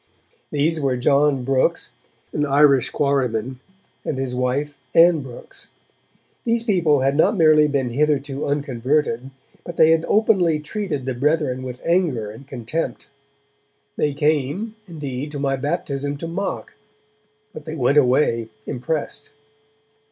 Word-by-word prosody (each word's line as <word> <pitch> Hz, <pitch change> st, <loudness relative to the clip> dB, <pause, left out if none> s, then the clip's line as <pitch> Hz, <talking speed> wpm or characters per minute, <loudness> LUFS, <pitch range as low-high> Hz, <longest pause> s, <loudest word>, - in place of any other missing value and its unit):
These 155 Hz, +3 st, 0 dB
were 135 Hz, -3 st, 0 dB
John 140 Hz, +1 st, +2 dB
Brooks, 135 Hz, 0 st, 0 dB, 0.4 s
an 150 Hz, -, 0 dB
Irish 140 Hz, -2 st, +4 dB
quarryman, 130 Hz, -3 st, -1 dB, 0.4 s
and 140 Hz, -, -3 dB
his 130 Hz, -1 st, -3 dB
wife, 130 Hz, +4 st, -1 dB, 0.2 s
Ann 165 Hz, -2 st, +6 dB
Brooks. 130 Hz, -3 st, -9 dB, 0.7 s
These 230 Hz, -1 st, 0 dB
people 170 Hz, -, +2 dB
had 135 Hz, +1 st, +1 dB
not 160 Hz, +7 st, +3 dB
merely 155 Hz, -2 st, +5 dB
been 135 Hz, -4 st, -1 dB
hitherto 140 Hz, 0 st, 0 dB
unconverted, 135 Hz, -2 st, -1 dB, 0.3 s
but 175 Hz, -, -7 dB
they 160 Hz, 0 st, +6 dB
had 165 Hz, 0 st, +3 dB
openly 190 Hz, -7 st, +3 dB
treated 150 Hz, -, -4 dB
the 130 Hz, -, -1 dB
Brethren 140 Hz, 0 st, 0 dB
with 125 Hz, -1 st, -7 dB
anger 160 Hz, -, +1 dB
and 120 Hz, +5 st, -13 dB
contempt. 130 Hz, +5 st, -4 dB, 0.9 s
They 145 Hz, -2 st, 0 dB
came, 155 Hz, -, 0 dB
indeed, 145 Hz, -4 st, -5 dB
to 145 Hz, -, -4 dB
my 135 Hz, -1 st, 0 dB
baptism 145 Hz, 0 st, -3 dB
to 165 Hz, -, -5 dB
mock, 190 Hz, +4 st, -4 dB, 0.8 s
but 150 Hz, -, -9 dB
they 155 Hz, -, -5 dB
went 140 Hz, +1 st, +3 dB
away 125 Hz, -4 st, +2 dB, 0.2 s
impressed. 145 Hz, +3 st, -4 dB
145 Hz, 130 wpm, -21 LUFS, 130-155 Hz, 0.9 s, Ann